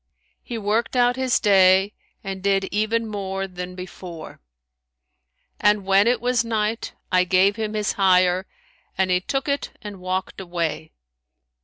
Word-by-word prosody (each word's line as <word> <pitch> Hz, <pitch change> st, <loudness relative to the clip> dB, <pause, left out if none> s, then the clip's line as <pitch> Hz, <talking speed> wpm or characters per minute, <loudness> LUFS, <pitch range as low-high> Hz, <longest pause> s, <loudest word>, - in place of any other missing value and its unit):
he 240 Hz, -, -6 dB
worked 220 Hz, +4 st, -1 dB
out 245 Hz, 0 st, +3 dB
his 260 Hz, -1 st, +1 dB
day 195 Hz, 0 st, +4 dB, 0.3 s
and 195 Hz, -1 st, -5 dB
did 195 Hz, 0 st, +2 dB
even 215 Hz, +3 st, 0 dB
more 195 Hz, -2 st, -4 dB
than 180 Hz, 0 st, -7 dB
before; 180 Hz, -3 st, -9 dB, 1.2 s
and 210 Hz, -1 st, +2 dB
when 195 Hz, +2 st, +4 dB
it 240 Hz, -1 st, +2 dB
was 245 Hz, 0 st, +1 dB
night, 225 Hz, 0 st, -2 dB, 0.2 s
I 185 Hz, 0 st, +4 dB
gave 185 Hz, +3 st, +3 dB
him 215 Hz, -1 st, -3 dB
his 210 Hz, -1 st, 0 dB
hire, 185 Hz, -1 st, +3 dB, 0.5 s
and 190 Hz, -1 st, +1 dB
he 180 Hz, 0 st, +2 dB
took 270 Hz, +8 st, -2 dB
it 280 Hz, 0 st, -3 dB
and 205 Hz, -2 st, -9 dB
walked 185 Hz, +1 st, -3 dB
away. 170 Hz, -3 st, -3 dB
195 Hz, 145 wpm, -23 LUFS, 185-220 Hz, 1.2 s, day